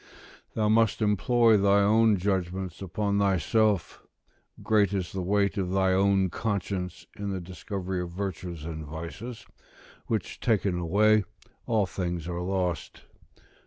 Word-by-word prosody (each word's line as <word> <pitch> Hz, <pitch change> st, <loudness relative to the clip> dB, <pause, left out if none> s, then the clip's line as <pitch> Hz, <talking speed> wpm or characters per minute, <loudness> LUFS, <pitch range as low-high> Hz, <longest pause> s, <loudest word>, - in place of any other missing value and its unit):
["Thou 110 Hz, -1 st, +1 dB
must 110 Hz, -1 st, +3 dB
employ 110 Hz, +2 st, +3 dB
thy 100 Hz, 0 st, +4 dB
own 110 Hz, +1 st, +4 dB
judgment 95 Hz, -1 st, -2 dB
upon 100 Hz, +2 st, -1 dB
thyself; 100 Hz, 0 st, +1 dB, 0.6 s
great 105 Hz, -3 st, +3 dB
is 90 Hz, -3 st, -2 dB
the 95 Hz, -, -3 dB
weight 100 Hz, +2 st, +1 dB
of 90 Hz, -2 st, -1 dB
thy 95 Hz, 0 st, +2 dB
own 95 Hz, -1 st, +3 dB
conscience 95 Hz, -4 st, -3 dB
in 100 Hz, 0 st, -4 dB
the 95 Hz, -1 st, -2 dB
discovery 95 Hz, +1 st, -5 dB
of 90 Hz, -, -5 dB
virtues 90 Hz, -3 st, -5 dB
and 80 Hz, -1 st, -5 dB
vices: 85 Hz, +10 st, -7 dB, 0.6 s
which 110 Hz, -5 st, -3 dB
taken 100 Hz, -6 st, +1 dB
away, 105 Hz, +5 st, +3 dB, 0.4 s
all 110 Hz, -3 st, +2 dB
things 90 Hz, -3 st, -4 dB
are 85 Hz, 0 st, -3 dB
lost." 90 Hz, -2 st, -2 dB
95 Hz, 130 wpm, -27 LUFS, 90-105 Hz, 0.6 s, thy